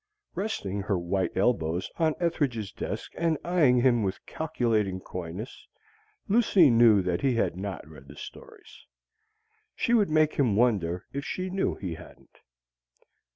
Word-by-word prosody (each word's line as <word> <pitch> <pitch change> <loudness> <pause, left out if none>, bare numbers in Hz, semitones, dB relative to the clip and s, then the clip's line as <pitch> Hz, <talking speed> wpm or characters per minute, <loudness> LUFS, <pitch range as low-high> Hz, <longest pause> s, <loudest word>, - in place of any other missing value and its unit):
Resting 135 - -3
her 100 -1 -1
white 90 +1 -2
elbows 90 -5 0
on 160 -2 +1
Ethridge's 135 - -1
desk - - -5
and 165 -2 +1
eyeing 150 -9 +3
him 120 -2 +3
with 95 -2 -3
calculating 115 -11 -1
coyness, 90 +5 -8 0.6
Lucy 200 - +5
knew 115 -4 +5
that 90 -1 -1
he 135 -3 +2
had 115 - 0
not 95 -4 -6
read 75 -3 -14
the 70 - -12
stories. 445 - -13 0.9
She 235 - 0
would 210 -6 +4
make 155 0 +3
him 125 -8 +1
wonder 100 -7 +1
if 140 +1 -3
she 185 +4 -4
knew 190 +1 0
he 90 -4 -5
hadn't. 80 - -15
115 Hz, 145 wpm, -27 LUFS, -, 0.9 s, Lucy